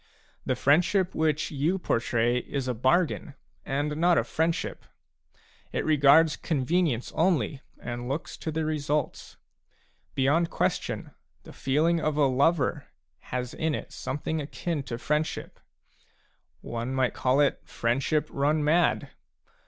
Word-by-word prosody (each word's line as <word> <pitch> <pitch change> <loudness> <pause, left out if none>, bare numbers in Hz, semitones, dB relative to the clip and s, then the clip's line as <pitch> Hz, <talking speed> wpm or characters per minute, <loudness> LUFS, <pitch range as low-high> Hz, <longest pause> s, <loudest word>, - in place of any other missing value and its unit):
The - - +1
friendship 180 +6 +3
which 155 -1 0
you 155 +6 0
portray 120 -5 +1
is 135 +1 -4
a 125 - 0
bargain 145 +5 +1 0.3
and 145 +2 -2
not 170 +1 +4
a - - +3
friendship; 165 +1 -2 0.9
it - - -2
regards 155 +1 +5
convenience 155 -3 0
only, 150 - +1 0.2
and 120 +1 -5
looks 145 +4 -4
to 160 - -4
the 160 0 -1
results. 150 -1 -2 0.8
Beyond 150 +6 +2
question - - -2 0.3
the - - -12
feel 140 +4 +1
ing 170 0 +3
of 155 -2 -1
a 145 - +4
lover 140 +2 +1 0.4
has 125 -1 -3
in 160 -2 -1
it - - -7
something 155 +3 -3
akin 155 +2 -3
to 115 - -4
friendship; 150 +5 -2 1.0
one 120 +3 -4
might 130 -2 +1
call 130 +2 +1
it 145 -1 +3
friendship 135 +6 0
run 150 +2 +1
mad. 155 -2 +2
150 Hz, 130 wpm, -27 LUFS, 130-160 Hz, 1.0 s, regards